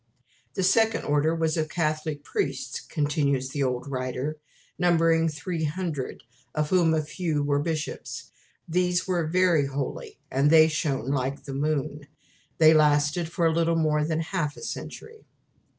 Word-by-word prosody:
"The 190 Hz, -, 0 dB
Second 225 Hz, +4 st, +3 dB
Order 150 Hz, +3 st, +1 dB
was 160 Hz, 0 st, 0 dB
of 155 Hz, -1 st, -1 dB
Catholic 155 Hz, -2 st, -2 dB
Priests" 410 Hz, -, -3 dB
continues 145 Hz, -3 st, 0 dB
the 145 Hz, +1 st, -3 dB
old 125 Hz, -1 st, -1 dB
writer 130 Hz, +3 st, -3 dB, 0.4 s
"numbering 165 Hz, -2 st, +3 dB
300, 160 Hz, -1 st, -4 dB, 0.3 s
of 150 Hz, -1 st, -1 dB
whom 170 Hz, -3 st, +4 dB
a 155 Hz, -, 0 dB
few 155 Hz, -1 st, -2 dB
were 145 Hz, 0 st, +1 dB
bishops. 155 Hz, 0 st, -4 dB, 0.4 s
These 180 Hz, +1 st, +1 dB
were 175 Hz, -4 st, 0 dB
VERY 170 Hz, -4 st, +3 dB
HOLY, 415 Hz, -, -5 dB
and 140 Hz, +3 st, +3 dB
they 160 Hz, 0 st, +7 dB
shone 140 Hz, -5 st, -1 dB
like 135 Hz, 0 st, -2 dB
the 135 Hz, -, -7 dB
moon." 145 Hz, 0 st, -2 dB, 0.5 s
They 160 Hz, 0 st, +7 dB
lasted 150 Hz, +2 st, +2 dB
for 170 Hz, -, 0 dB
a 165 Hz, -, +3 dB
little 165 Hz, 0 st, +2 dB
more 155 Hz, -2 st, +2 dB
than 160 Hz, +1 st, -1 dB
half 160 Hz, -3 st, -2 dB
a -, -, -10 dB
century. 450 Hz, -1 st, -8 dB
155 Hz, 150 wpm, -26 LUFS, 145-170 Hz, 0.5 s, they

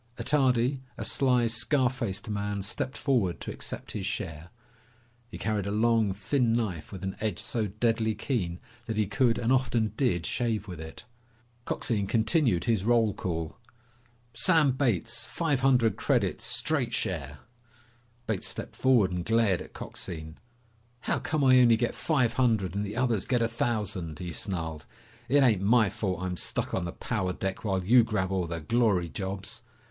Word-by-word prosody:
Attardi, 130 Hz, -2 st, +2 dB, 0.2 s
a -, -, -3 dB
sly, 125 Hz, -3 st, +2 dB
scar 120 Hz, +4 st, +2 dB
faced 115 Hz, -7 st, -3 dB
man, 100 Hz, -1 st, -2 dB
stepped 130 Hz, +6 st, -4 dB
forward 115 Hz, -, +1 dB
to -, -, -5 dB
accept -, -, -5 dB
his 100 Hz, -2 st, -3 dB
share. 85 Hz, -5 st, -4 dB, 0.8 s
He -, -, -8 dB
carried 105 Hz, -3 st, -1 dB
a -, -, -2 dB
long, 110 Hz, -1 st, +2 dB
thin 115 Hz, +5 st, +1 dB
knife 95 Hz, -10 st, -2 dB
with 95 Hz, -1 st, -8 dB
an 95 Hz, 0 st, -3 dB
edge 105 Hz, -5 st, -1 dB
so 110 Hz, -1 st, -1 dB
deadly 110 Hz, +1 st, 0 dB
keen 100 Hz, -7 st, -2 dB, 0.3 s
that 110 Hz, -2 st, -3 dB
he 105 Hz, -, +3 dB
could 115 Hz, +4 st, +2 dB
and 120 Hz, +1 st, 0 dB
often 120 Hz, -4 st, +1 dB
did 100 Hz, -, +1 dB
shave 110 Hz, +2 st, -1 dB
with 90 Hz, -4 st, -7 dB
it. 80 Hz, +7 st, -9 dB, 0.6 s
Coxine 105 Hz, -4 st, -1 dB
continued 110 Hz, -, +2 dB
his 110 Hz, -5 st, +1 dB
roll 115 Hz, -2 st, +3 dB
call. 80 Hz, -3 st, -4 dB, 0.7 s
"Sam 160 Hz, 0 st, +4 dB
Bates! 125 Hz, -, 0 dB
Five 155 Hz, -6 st, 0 dB
hundred 125 Hz, -6 st, +3 dB
credits. -, -, 0 dB
Straight -, -, -1 dB
share." 70 Hz, +1 st, -3 dB, 0.9 s
Bates 110 Hz, -4 st, -2 dB
stepped -, -, -7 dB
forward 120 Hz, -8 st, +3 dB
and 90 Hz, -1 st, -2 dB
glared 110 Hz, -3 st, +2 dB
at -, -, -11 dB
Coxine. 80 Hz, -1 st, -6 dB, 0.6 s
"How -, -, 0 dB
come 155 Hz, -2 st, -1 dB
I 130 Hz, -1 st, +7 dB
only 120 Hz, -2 st, +6 dB
get 120 Hz, +1 st, 0 dB
five 130 Hz, -8 st, +1 dB
hundred 115 Hz, -8 st, +1 dB
and 100 Hz, +1 st, -1 dB
the 105 Hz, +2 st, -5 dB
others 120 Hz, -6 st, +1 dB
get 120 Hz, -2 st, +2 dB
a -, -, +2 dB
thousand?" 105 Hz, -9 st, -2 dB
he 90 Hz, -2 st, -5 dB
snarled. 80 Hz, -5 st, -4 dB, 0.4 s
"It 140 Hz, +2 st, +5 dB
ain't 110 Hz, -7 st, +3 dB
my 110 Hz, +1 st, +4 dB
fault 95 Hz, -2 st, -3 dB
I'm 90 Hz, -1 st, -3 dB
stuck -, -, -1 dB
on 90 Hz, -, -1 dB
the 85 Hz, -, -4 dB
power 95 Hz, -4 st, -2 dB
deck 95 Hz, +1 st, -4 dB
while 95 Hz, -4 st, -1 dB
you 120 Hz, +4 st, +6 dB
grab 100 Hz, -5 st, -1 dB
all 95 Hz, -3 st, 0 dB
the 85 Hz, -1 st, -4 dB
glory 105 Hz, -2 st, +2 dB
jobs!" 95 Hz, +3 st, -4 dB
110 Hz, 170 wpm, -28 LUFS, 95-120 Hz, 0.9 s, I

